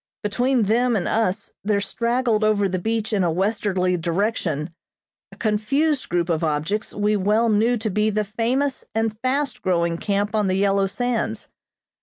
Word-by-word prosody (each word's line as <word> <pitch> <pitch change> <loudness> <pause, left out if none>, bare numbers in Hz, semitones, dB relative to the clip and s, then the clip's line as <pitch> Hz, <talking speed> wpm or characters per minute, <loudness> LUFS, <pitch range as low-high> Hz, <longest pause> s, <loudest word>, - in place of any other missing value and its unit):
Between 245 +4 +1
them 235 +4 +2
and 195 - -1
us 210 -2 0
there 205 0 +1
straggled 235 +2 0
over 210 -2 +3
the 185 -1 -2
beach 225 +3 -2
in 200 -3 +2
a 175 - +2
westerly 185 -1 0
direction, 170 -3 -1 0.6
a - - -14
confused 270 +7 0
group 175 -1 0
of 165 -2 0
objects 160 +7 -1
we 210 +1 +1
well 210 +4 +2
knew 225 +3 +3
to 220 0 -2
be 210 +3 +1
the 215 0 0
famous 245 +6 -1
and 225 -1 0
fast 270 +3 -1
growing 170 -2 0
camp 205 +1 -1
on 210 -2 +1
the 185 - +1
yellow 195 0 +2
sands. 230 - -2
210 Hz, 165 wpm, -22 LUFS, 190-230 Hz, 0.6 s, over